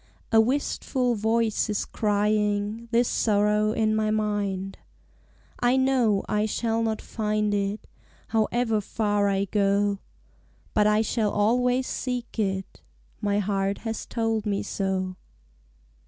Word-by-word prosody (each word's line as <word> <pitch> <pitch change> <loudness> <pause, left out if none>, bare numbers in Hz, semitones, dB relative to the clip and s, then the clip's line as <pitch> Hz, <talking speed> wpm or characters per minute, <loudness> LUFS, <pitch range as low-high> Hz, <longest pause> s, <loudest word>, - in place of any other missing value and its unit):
A 225 -1 +6
wistful 255 0 0
voice 225 0 +1
is 210 - -1
crying 210 +1 0
This 235 +1 +3
sorrow 210 0 +2
in 220 -1 +1
my 215 0 +1
mind. 205 -3 -1 0.8
I 245 +2 +3
know 255 -6 +2
I 210 +1 +1
shall 225 +1 -1
not 220 -1 -1
find 210 -1 -1
it 200 +1 -2 0.4
However 225 0 +1
far 205 0 0
I 195 0 +1
go, 200 0 +1 0.7
But 210 0 +4
I 210 +1 +3
shall 220 -1 0
always 245 +5 +2
seek 245 -3 -4
it; 190 -2 -2 0.4
My 205 -1 +1
heart 195 -1 0
has 225 -1 -4
told 225 -2 -1
me 200 -1 0
so. 190 -1 -2
215 Hz, 125 wpm, -26 LUFS, 205-225 Hz, 0.8 s, A